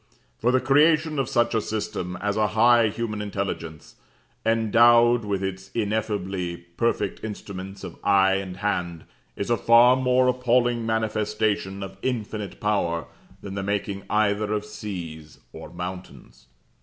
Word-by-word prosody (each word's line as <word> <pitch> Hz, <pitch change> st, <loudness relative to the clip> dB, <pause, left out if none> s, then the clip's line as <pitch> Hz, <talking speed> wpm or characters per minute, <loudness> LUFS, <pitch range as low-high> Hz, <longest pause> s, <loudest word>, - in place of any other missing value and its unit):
For 120 Hz, -, +2 dB
the 130 Hz, -, +3 dB
creation 155 Hz, +2 st, +3 dB
of 135 Hz, -, -1 dB
such 120 Hz, 0 st, +1 dB
a 110 Hz, -, +2 dB
system 95 Hz, -4 st, -4 dB
as 105 Hz, 0 st, -1 dB
a 110 Hz, -1 st, +2 dB
high 120 Hz, 0 st, +6 dB
human 110 Hz, 0 st, -3 dB
intelligence, 95 Hz, -6 st, -5 dB, 0.5 s
endowed 115 Hz, +1 st, +4 dB
with 100 Hz, -2 st, -2 dB
its 95 Hz, 0 st, -5 dB
ineffably 100 Hz, -5 st, -2 dB
perfect 85 Hz, +7 st, -2 dB
instruments 100 Hz, -2 st, -7 dB
of -, -, -9 dB
eye 95 Hz, -1 st, +4 dB
and 95 Hz, -1 st, -6 dB
hand, 90 Hz, -5 st, -2 dB, 0.3 s
is 100 Hz, -, -3 dB
a 120 Hz, -, +3 dB
far 120 Hz, +3 st, +6 dB
more 130 Hz, 0 st, +2 dB
appalling 120 Hz, -2 st, +1 dB
manifestation 105 Hz, -3 st, -1 dB
of 95 Hz, 0 st, -9 dB
Infinite 110 Hz, -5 st, -4 dB
Power, 85 Hz, -6 st, 0 dB, 0.4 s
than 100 Hz, -, -6 dB
the 100 Hz, -, -3 dB
making 100 Hz, 0 st, -2 dB
either 105 Hz, 0 st, +1 dB
of 105 Hz, -1 st, -1 dB
seas 90 Hz, -8 st, -8 dB, 0.2 s
or -, -, -9 dB
mountains. 90 Hz, -5 st, -9 dB
105 Hz, 140 wpm, -24 LUFS, 95-115 Hz, 0.5 s, high